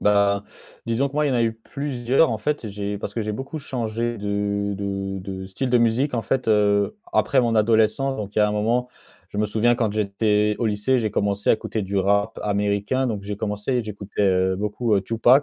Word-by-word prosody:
Bah, 100 -1 +3 0.4
disons 115 +4 +1
que 140 - -15
moi, 150 0 +2
il - - +1
y - - 0
en - - +1
a 120 - +2
eu 115 -1 +1
plusieurs, 130 +3 0
en 110 - -2
fait 145 +5 -2
et 110 - -4
j'ai 100 0 -4
parce - - -6
que 115 - -1
j'ai 105 - -3
beaucoup 135 +8 -5
changé 120 -3 -3
de 100 0 -1
de 100 -1 -3
de 95 0 -6
style 125 +7 -3
de 125 - +5
musique, 120 +5 +2
en 115 - 0
fait, 130 -1 -1
heu, 105 - +3 0.2
après 135 - +3
mon 115 -2 +1
adolescence. 110 +5 +2
Donc, 105 -1 -6
il - - 0
y - - +5
a 105 - +4
un 105 - -1
moment, 115 +4 0 0.4
je 105 - -6
me 105 - +2
souviens, 110 +3 +2
quand 115 -4 0
j'étais 105 0 +1
au 115 - 0
lycée, 110 +5 +1
j'ai 110 -3 -1
commencé 100 0 0
à - - +7
écouter 110 -1 -2
du 100 +1 -3
rap 100 +3 +1
américain. 105 +5 0
Donc 105 -5 -3
j'ai 100 +1 -5
commencé, 105 +4 -1
j'écoutais, 105 -1 -4
heu, 95 0 +2
beaucoup, 105 +3 0
heu, - - +2
2Pac. 115 +7 +4
105 Hz, 230 wpm, -23 LUFS, 100-120 Hz, 0.4 s, à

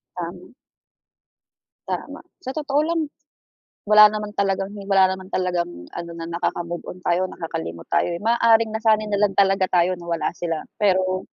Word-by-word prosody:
Tama. - - -7 1.3
Tama, - - -5 0.2
sa 265 -7 -6
totoo 290 -2 0
lang, 335 0 0 0.8
wala 210 0 +8
naman 210 0 -2
talagang 195 0 0 0.2
wala 195 -1 +4
naman 190 0 -5
talagang 175 - -2
ano 170 0 -7
na 165 0 -6
nakaka-move-on 175 +1 -4
tayo 175 +2 +1
nakakalimot 85 - -6
tayo 75 - +1
eh, 170 - -6
maaaring 230 -1 +4
nasanay 215 -1 +1
na 205 - +1
lang 195 - -7
talaga 195 -1 +3
tayo 180 0 +2
na 170 - -11
wala 170 -1 -1
sila, 165 -2 -2 0.2
pero, 185 -2 +1
185 Hz, 145 wpm, -22 LUFS, 175-210 Hz, 1.3 s, wala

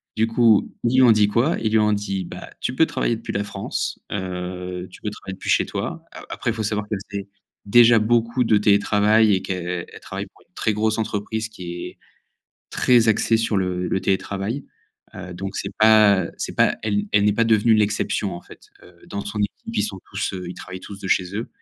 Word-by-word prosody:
Du 110 - +2
coup, 115 -2 +3
ils 120 - +2
lui 130 - +6
ont 120 - +7
dit 105 -1 +4
quoi? 120 +9 +1
Ils 110 -1 0
lui 110 - +5
ont 105 0 +3
dit: 100 -2 -2
«Bah, - - -9
tu 125 - -2
peux 160 +5 +4
travailler 115 - -1
depuis 115 - -6
la 100 - -1
France, 105 - -4
heu, 90 -1 -5
tu - - -15
peux 105 - -2
travailler 95 - -8
depuis - - -7
chez - - +3
toi». - - -4
A - - -10
après, - - -3
il - - -3
faut 110 -1 -3
savoir 105 0 -2
qu'elle 105 - -2
faisait 100 0 -5 0.4
déjà 115 +2 +6
beaucoup 115 +3 +1
de 110 -2 +4
télétravail 105 +1 +4
et 95 - -2
qu'elle 90 -2 -4
elle - - -11
travaille - - -6
pour - - -25
une - - -47
très 110 - 0
grosse 110 +1 0
entreprise 110 +1 -2
qui 110 -4 -11 0.2
est - - -13 0.7
très 120 -2 +4
axée 110 +1 +3
sur 115 -2 0
le 90 -1 -1
le 95 - -1
télétravail, 100 +7 -2 0.5
heu, 90 -1 -8
donc 95 +2 -6
c'est - - -3
pas 110 -4 +6
c'est - - -5
pas - - +3
elle 105 -1 0
elle 105 0 +4
n'est 105 - +4
pas 115 +3 +2
devenue 110 0 +4
l'exception 105 -2 0
en 85 - -8
fait, - - -16 0.2
heu, - - -17
dans 100 0 -5
son 105 +1 -5
équipe 105 +2 -4
ils - - +3
sont 100 -2 -4
tous, 100 +1 -2
heu, 90 -1 -6
ils 90 - -6
travaillent 95 - -9
tous 100 +1 -9
de 95 - -6
chez 90 +1 +1
eux. 115 - -4
105 Hz, 225 wpm, -22 LUFS, 95-110 Hz, 0.7 s, ont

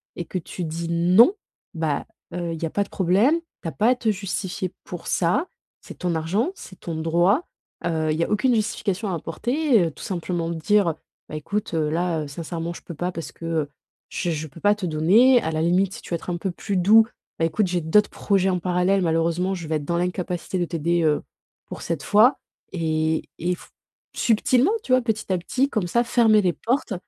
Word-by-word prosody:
et 175 - -5
que 185 - -3
tu 180 +2 -7
dis: 165 +1 -4
«Non», 180 - +5 0.4
bah, 160 -3 -1 0.3
heu, 170 -1 -3
il 165 - -6
y - - +2
a - - -2
pas 205 - +1
de 200 - -14
problème, 200 - +3 0.2
tu - - -5
as - - -2
pas 210 - +2
à 255 - +4
te 240 -3 -1
justifier 190 -2 -3
pour 175 -2 -8
ça. 220 - +1 0.3
C'est - - -12
ton 175 -2 -1
argent, 180 - 0
c'est 185 - -12
ton 170 - -5
droit, 175 - +2 0.4
heu, 160 -2 0
il 155 - -1
y 170 - +1
a - - -2
aucune 245 +4 +2
justification 215 -1 -1
à - - -1
apporter, 240 - +1
heu, - - -5
tout - - -12
simplement 175 -2 -2
de 170 - -3
dire, 200 +4 +2
heu: - - -1 0.4
«Bah, - - -6
écoute, 195 +8 -3
heu, 155 -2 +1
là, 165 0 0
heu, - - -7
sincèrement, 165 +3 -5
je - - -11
peux 170 - -9
pas 175 +4 -2
parce 165 -2 -7
que, 165 - -10
heu, 160 -3 -1 0.4
je 175 - -2
je 155 0 -3
peux 155 +3 -14
pas 205 0 +5
te 210 -3 -5
donner», 200 +11 +5
à 160 - -1
la 155 0 -1
limite, 180 +3 +2
si 235 - -9
tu - - -13
veux - - +1
être 170 - -7
un 175 - -1
peu 190 +3 -3
plus 195 +2 -3
doux: 215 +5 +6 0.3
«Bah, 165 - +3
écoute, 195 +5 +1
j'ai 175 -1 -1
d'autres 205 +7 +3
projets 195 -2 +1
en 185 - +1
parallèle, 180 +2 +1
malheureusement, 165 +3 +1
je 170 -4 -6
vais 160 - -1
être 150 -2 -3
dans 170 +3 -1
l'incapacité 180 0 -2
de 175 - +1
t'aider, 170 +1 0
heu, 150 -2 +2 0.5
pour - - -8
cette 165 -4 -2
fois» 220 +6 +5 0.3
et 160 -2 -1
et 180 +2 -1
f - - -16 0.5
subtilement, 250 - +3
tu 255 - 0
vois, 255 - +5
petit 220 -4 -2
à 185 - +2
petit, 260 +10 0
comme 215 -9 -1
ça, 235 +7 +2
fermer 225 -3 +4
les 180 -3 +1
portes 240 - -1
180 Hz, 230 wpm, -23 LUFS, 165-210 Hz, 0.5 s, doux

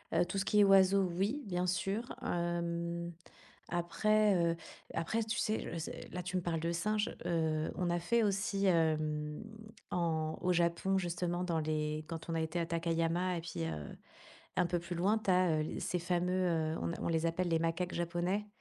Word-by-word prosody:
Heu, - - +4
tout 195 - -2
ce 195 - -1
qui 210 -1 +4
est - - +8
oiseaux, 195 0 +6
oui, 220 +10 0
bien 180 -2 -1
sûr. 195 +5 0 0.2
Hem, 170 0 -2 0.6
après, 210 +5 +2 0.2
heu, - - -4 0.4
après, 220 +8 0
tu 225 +2 -2
sais 215 -1 +1 0.2
je 160 - -4 0.2
là, 180 - -2
tu 185 +1 -3
me 180 - 0
parles 165 -2 -1
de 170 - -1
singe, 210 +6 0
heu, 160 -2 0
on 180 -2 0
a 175 0 +1
fait 230 +7 +2
aussi, 200 0 +1
hem, 155 -2 +1 0.5
en 160 -2 0
au 180 - +3
Japon, 175 +3 +2
justement, 175 0 -1
dans 165 -3 0
les 155 0 -1
quand 165 -1 -6
on 165 - -1
a 165 - 0
été 160 +2 -2
à 165 - 0
Takayama 170 +2 0
et - - -3
puis, 155 - -4
heu, 75 -2 -5 0.6
un - - +3
peu 175 0 0
plus 170 +1 -5
loin, 195 +6 +3
tu 215 - -1
as, 180 -4 +4
heu, 155 - -4
ces 180 - -1
fameux, 180 +2 0 0.3
heu, - - -4
on - - -1
a - - -6
on - - -1
les 165 0 +1
appelle 175 +2 0
les 165 - +2
macaques 165 +2 -1
japonais. 175 +4 -1
175 Hz, 195 wpm, -34 LUFS, 165-190 Hz, 0.6 s, est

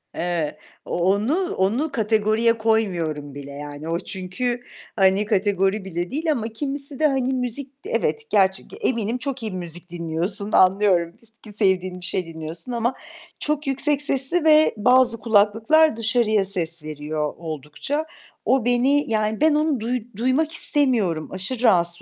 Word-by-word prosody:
Eee, 170 -3 -2 0.3
onu 210 - 0
onu 230 +12 0
kategoriye 220 0 +2
koymuyorum 175 -10 -1
bile. 140 0 -8
Yani 145 +2 -8
o 170 - 0
çünkü, 200 +8 -3 0.4
hani, 195 0 +3
kategori 200 -1 +1
bile 175 -1 -4
değil. 315 +3 0
Ama 235 -7 -1
kimisi 275 +4 -4
de, 310 - +4
hani, 265 -2 0
müzik 255 +2 -3
evet, 455 0 -2
gerç 190 -2 +3
g - - -10
eminim 230 -1 0
çok 270 -2 -5
iyi 220 - 0
müzik 175 -1 -6
dinliyorsun, 175 +5 -4
anlıyorum 185 -3 +3
ki - - -18
s 225 - -9
ki 210 -2 -10
sevdiğin 185 -3 0
bir - - -6
şey 185 0 -2
dinliyorsun 165 +6 -7
ama 240 +1 0 0.5
çok 300 -1 -2
yüksek 285 +2 +1
sesli 280 +4 +1
ve 310 0 +6
bazı 250 +1 +4
kulaklıklar 225 +8 +3
dışarıya 225 -2 +2
ses 170 -4 -2
veriyor 150 0 -4
oldukça. 160 - -4 0.4
O 260 -3 +2
beni 250 +3 +3
yani 215 0 0
ben 310 -1 +4
onu 300 -3 +1
duy 240 +3 -1 0.2
duymak 260 +7 +1
istemiyorum. 235 - +1
Aşırı 210 +7 -4
rahatsız 175 -6 +3
215 Hz, 150 wpm, -22 LUFS, 180-260 Hz, 0.5 s, ve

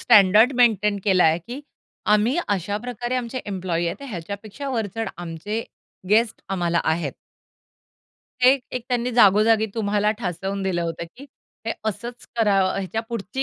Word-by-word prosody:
Standard 210 +5 +6
maintain 210 -4 +3
केलाय, 180 -5 +4
की 240 - -8 0.5
आम्ही 225 +7 +2
अशा 200 0 -1
प्रकारे 245 +1 -4
आमचे 250 +1 -3
एम्प्लॉयी 180 -4 -2
आहेत, 170 - -2
तर 280 - -8
ह्याच्यापेक्षा 200 - -6
वरचढ 225 -2 -2
आमचे 175 +6 -4 0.5
गेस्ट 225 +2 +2
आम्हाला 175 -3 0
आहेत. 160 -3 0 1.3
हे 250 - +8 0.3
एक 245 - -6
त्यांनी 245 -1 0
जागोजागी 220 0 +5
तुम्हाला 210 -1 +1
ठासवून 195 0 -3
दिलं 180 -3 0
होतं, 170 0 -3
की 275 - -11 0.4
हे 225 - 0 0.2
असंच 235 +4 -6
करा. 210 -4 +3 0.2
ह्याच्या 195 +3 -2
पुढची 230 +3 -3
210 Hz, 140 wpm, -23 LUFS, 185-235 Hz, 1.3 s, हे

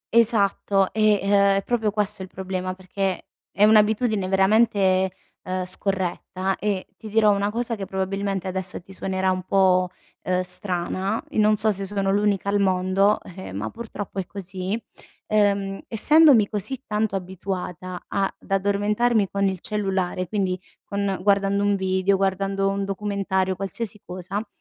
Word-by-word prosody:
Esatto, 200 -4 +3
e, 215 -2 +3
ehm, 200 - -1 0.3
è 195 - -1
proprio 230 -3 +1
questo 210 -1 -2
il 190 - -6
problema 185 0 -4
perché 190 0 -3 0.2
è 200 - +1
un'abitudine 215 -1 +4
veramente, 190 -1 +3 0.3
uhm, 185 0 -2
scorretta 190 0 -2
e 200 -3 -1
ti 215 - -9
dirò 215 -1 +4
una 200 +1 +1
cosa 235 +1 -2
che 195 -3 -5
probabilmente 195 0 -2
adesso 185 0 -3
ti 190 +2 -15
suonerà 190 0 -1
un 185 0 -1
po', 185 -1 +3 0.4
uhm, 185 0 +1
strana, 185 +2 -2
i - - -2
non 215 0 +4
so 215 +1 +3
se 195 -1 -3
sono 195 -1 0
l'unica 200 -1 +1
al 205 0 +2
mondo, 190 +2 +2 0.2
eh, 190 - -8
ma 105 +3 -4
purtroppo 210 -4 -6
è 185 - -4
così, 190 +2 -4 0.5
uhm, 200 -2 +1
essendomi 265 -1 +6
così 240 +5 -4
tanto 210 -1 -1
abituata 185 -1 -5
a 195 -1 0
d'addormentarmi 205 +2 +1
con 200 0 0
il 190 -2 -3
cellulare, 190 -3 -2
quindi 185 -2 -1 0.2
con 200 -1 -2
guardando 200 0 +2
un 205 0 +3
video, 190 0 +1
guardando 195 0 0
un 195 0 -1
documentario, 195 -1 -1
qualsiasi 200 +2 -5
cosa, 185 +4 -5
195 Hz, 150 wpm, -24 LUFS, 185-210 Hz, 0.5 s, essendomi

